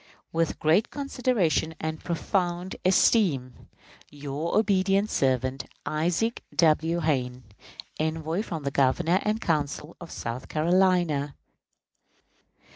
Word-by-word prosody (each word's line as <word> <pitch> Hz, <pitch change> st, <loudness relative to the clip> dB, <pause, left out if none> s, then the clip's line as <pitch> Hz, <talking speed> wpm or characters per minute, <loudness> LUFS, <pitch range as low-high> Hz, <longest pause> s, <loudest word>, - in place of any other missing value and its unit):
With 165 Hz, 0 st, 0 dB
great 160 Hz, +8 st, +2 dB
consideration 245 Hz, -, 0 dB
and 160 Hz, 0 st, -4 dB
profound 175 Hz, +1 st, -1 dB
esteem, 180 Hz, -, +2 dB, 0.4 s
Your 145 Hz, +3 st, -3 dB
obedient 200 Hz, -1 st, +2 dB
servant, 130 Hz, 0 st, 0 dB, 0.2 s
ISAAC 175 Hz, +9 st, 0 dB, 0.2 s
W. 165 Hz, +1 st, +3 dB
HAYNE, 130 Hz, -5 st, -1 dB, 0.6 s
_Envoy 160 Hz, +4 st, -1 dB
from 165 Hz, -8 st, -5 dB
the 140 Hz, -, -2 dB
Governor 155 Hz, +7 st, +2 dB
and 215 Hz, +1 st, 0 dB
Council 150 Hz, -3 st, -2 dB
of 170 Hz, -, -9 dB
South 115 Hz, +3 st, -5 dB
Carolina. 170 Hz, -4 st, +2 dB
160 Hz, 100 wpm, -26 LUFS, 145-185 Hz, 0.6 s, W